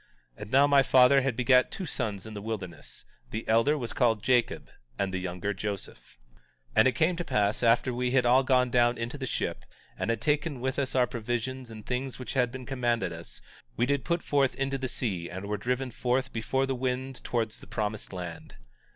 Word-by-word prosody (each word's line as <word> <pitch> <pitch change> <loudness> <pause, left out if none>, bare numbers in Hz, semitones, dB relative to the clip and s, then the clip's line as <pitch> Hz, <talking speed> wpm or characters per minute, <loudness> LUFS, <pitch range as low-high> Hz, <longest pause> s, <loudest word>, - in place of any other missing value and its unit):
18:7 - - -14
And - - -7
now, 140 +2 +6
my 140 -1 +5
father 130 +1 +6
had 135 -2 -1
begat 125 +1 +4
two 190 - -5
sons 110 - -3
in 110 - -8
the 100 - -6
wilderness; 100 -5 -6 0.2
the 110 +1 -5
elder 115 +7 +3
was 120 -5 -4
called 115 -4 +2
Jacob 120 -1 +1 0.3
and 95 -1 -1
the 95 - -1
younger 90 +3 -3
Joseph. 95 -13 -6 0.5
18:8 - - -28
And 110 - +7
it - - +4
came 170 +2 +2
to 175 - -2
pass 105 -8 +1
after 120 +1 +3
we 125 +1 0
had 125 -1 +3
all 125 +2 +6
gone 130 -2 +2
down 120 0 +3
into 120 +5 -4
the 130 - -3
ship, - - -2 0.3
and - - -3
had 115 -1 +1
taken 150 -1 0
with 130 +2 -2
us 135 -2 -2
our 125 -1 +5
provisions 120 +1 -3
and 110 -2 -10
things 130 +1 -3
which 130 - -6
had 125 -3 +2
been 130 0 -7
commanded 120 -8 0
us, 85 0 -6 0.4
we 120 - +3
did 140 -1 0
put 170 +4 -1
forth 140 -2 +2
into 135 0 -1
the 130 - -2
sea 95 -11 -3
and 95 +3 -6
were 105 +1 -2
driven 125 +4 -2
forth 125 +2 -1
before 130 +4 0
the 135 - -1
wind 130 +1 -3
towards 115 -2 -2
the - - -13
promised 105 -1 -3
land. 90 -3 -7
125 Hz, 215 wpm, -28 LUFS, 110-130 Hz, 0.5 s, And